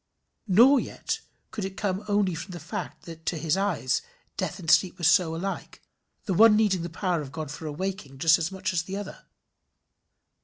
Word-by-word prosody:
Nor 240 +8 +6
yet - - -4 0.3
could 210 - -4
it 190 0 -5
come 195 -1 -1
only 205 -3 +2
from 165 +3 -6
the 175 - -6
fact 155 - -6
that 165 -1 -10
to 170 - 0
his 155 +2 0
eyes 190 -10 0 0.3
death 180 - -3
and 175 -5 -10
sleep 185 -1 +4
were 175 - -9
so 170 0 +4
alike, 195 +4 -5 0.5
the 195 - 0
one 220 +4 +7
needing 205 -4 +2
the 170 - -4
power 175 -1 -1
of 135 -3 -8
God 155 -2 -5
for 155 +2 -7
awaking 160 -3 -5
just 160 +3 +5
as 165 +2 -2
much 190 -1 -3
as 170 - +1
the 190 +3 -6
other. 205 -1 -8
180 Hz, 195 wpm, -27 LUFS, 160-195 Hz, 0.5 s, one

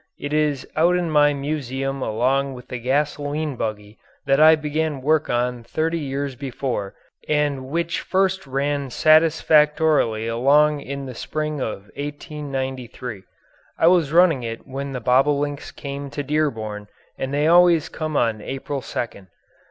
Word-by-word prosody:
It 145 +1 -5
is 150 -3 0
out 170 +3 +4
in 175 -2 -1
my 145 -1 +5
museum 135 -2 -3
along 130 +4 0
with 125 - -12
the 125 - -4
gasoline 145 +3 -1
buggy 105 -2 -5 0.3
that 135 0 +3
I 160 +1 +8
began 155 -2 -2
work 155 +1 +2
on 120 0 -1
thirty 160 +6 -1
years 140 -1 -3
before 125 -6 -4 0.3
and 145 -3 0
which 170 +4 -1
first 190 -4 0
ran 140 +1 -1
satisfactorily 155 -5 +3
along 145 +6 +3
in 140 0 -6
the 130 - -7
spring 155 +4 -3
of 110 -5 -4
1893. 135 -7 -5 0.5
I - - +2
was 170 -4 +4
running 165 -5 +5
it 115 -1 -6
when 140 +1 -5
the 125 - -4
bobolinks 145 +4 +1
came 140 0 -7
to 145 +1 -4
Dearborn 115 -9 -2 0.3
and 135 - -3
they 145 +1 +1
always 170 -1 +5
come 155 -2 -3
on 115 -2 +1
April 135 +3 -4
2nd. 100 -6 -5
140 Hz, 145 wpm, -22 LUFS, 130-155 Hz, 0.5 s, I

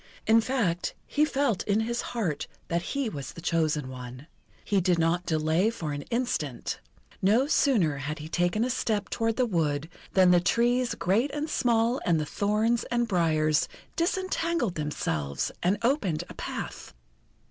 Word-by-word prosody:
In 225 +1 +5
fact, 220 -9 -1
he 300 +1 +2
felt 270 -9 0
in 210 +1 +2
his 235 +1 -1
heart 190 -12 -2 0.2
that 170 0 +1
he 275 +8 -2
was 140 -10 -6
the - - -10
chosen 155 -4 0
one. 125 +1 -8 0.4
He 200 -2 +2
did 180 -1 +2
not 170 +2 +1
delay 160 +5 +2
for 165 -10 -4
an 145 - -4
instant. 230 - -2 0.4
No 220 +8 +4
sooner 220 - +2
had 150 +3 -4
he 155 0 -7
taken 175 +6 +1
a 255 - -1
step 215 -5 -1
toward 225 -1 0
the 255 - +2
wood 160 -7 0 0.3
than 185 -2 +6
the 175 - +6
trees 240 +6 +2
great 215 +10 +1
and 300 +1 -2
small, 235 -2 +1
and 170 -2 +2
the 155 - -1
thorns 215 +7 +1
and 240 -1 0
briars, 155 -5 +2 0.3
disentangled 335 - 0
themselves 80 - -2
and 185 +4 +2
opened 230 - +1
a - - -8
path. - - -6
190 Hz, 160 wpm, -28 LUFS, 155-235 Hz, 0.4 s, than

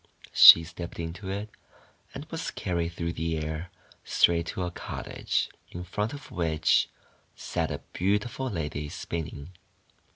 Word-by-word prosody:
She 85 - +11
stepped 85 0 -8
into 85 +4 -5
it, 100 +2 -4 0.6
and - - -6
was - - -3
carried 85 -1 -2
through 85 0 -3
the 80 0 -2
air 80 +2 -4 0.3
straight 85 -1 +3
to 95 - -3
a 90 - -3
cottage, - - -3 0.2
in 90 - -7
front 105 +5 -2
of 145 - -10
which 80 -3 +2 0.5
sat - - -2
a - - -4
beautiful 105 +7 0
lady 75 -5 -4
spinning. 80 -1 -5
85 Hz, 135 wpm, -28 LUFS, 80-95 Hz, 0.6 s, She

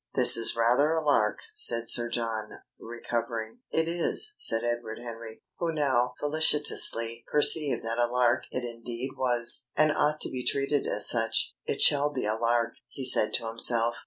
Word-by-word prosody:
"This - - +8
is 115 0 +2
rather 120 +6 +1
a 160 0 0
lark," 145 -9 0 0.2
said 115 0 +1
Sir 120 0 +2
John, 115 -2 -5 0.3
recovering. 115 -1 -6
"It 160 0 -1
is," 175 - 0
said 115 0 0
Edward 120 -2 -4
Henry, 115 -1 -11 0.2
who 170 -1 -2
now 130 -5 -1
felicitously 145 -6 +1
perceived 150 -1 +2
that 115 +1 -4
a 120 - +1
lark 120 0 0
it 130 - -5
indeed 120 +2 -7
was, 120 0 +2
and 155 0 +3
ought 150 0 -1
to - - -2
be 125 -1 -6
treated 140 +2 -1
as - - +2
such. 115 -1 0
"It - - -2
shall 145 0 +4
be 130 -6 -5
a 105 - -1
lark!" 115 +1 -1
he 130 +2 -4
said 115 -4 +5
to 115 - -5
himself. 115 +1 0
120 Hz, 170 wpm, -26 LUFS, 115-140 Hz, 0.3 s, This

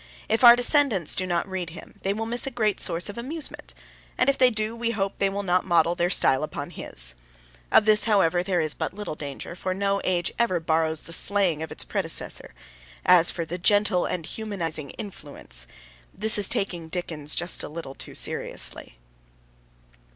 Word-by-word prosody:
If 225 +3 0
our 240 0 +10
descendants 245 - +3
do 185 - -2
not 175 +1 -1
read 185 -3 -4
him 165 - -13
they 195 - -1
will 220 +2 -3
miss 240 +3 +3
a - - 0
great 215 -5 -1
source 170 +1 -1
of 205 +2 -7
amusement, 295 +6 -4 0.4
and 265 +2 +3
if 275 - -8
they 255 -1 +6
do, 215 0 -1
we 230 0 -2
hope 200 -4 -3
they 195 - +2
will 200 +1 -3
not 180 -1 +1
model 170 -2 +2
their 175 0 0
style 135 -7 +3
upon 155 - -5
his. - - -1 0.6
Of 210 - +5
this, 215 -1 +6
however, 185 -5 +2
there 180 -1 -1
is 155 -2 +1
but - - -4
little 210 -5 -5
danger, 145 +2 -8
for 185 +1 -3
no 200 0 0
age 175 -2 -1
ever 225 -7 +1
borrows 160 -1 0
the 165 - -5
slang 185 -4 +3
of 160 - -6
its - - -2
predecessor. - - -4 0.5
As 175 -2 +6
for 170 - -4
'the 175 +3 -6
gentle 205 -1 +2
and 170 -3 -4
humanising 170 -10 -3
influence,' 145 - -4 0.4
this 215 +2 +2
is 200 - +6
taking 175 -4 -3
Dickens 160 -4 -2
just 175 +1 0
a - - -5
little 150 -3 -8
too - - -8
seriously. - - -3
185 Hz, 190 wpm, -25 LUFS, 165-215 Hz, 0.6 s, our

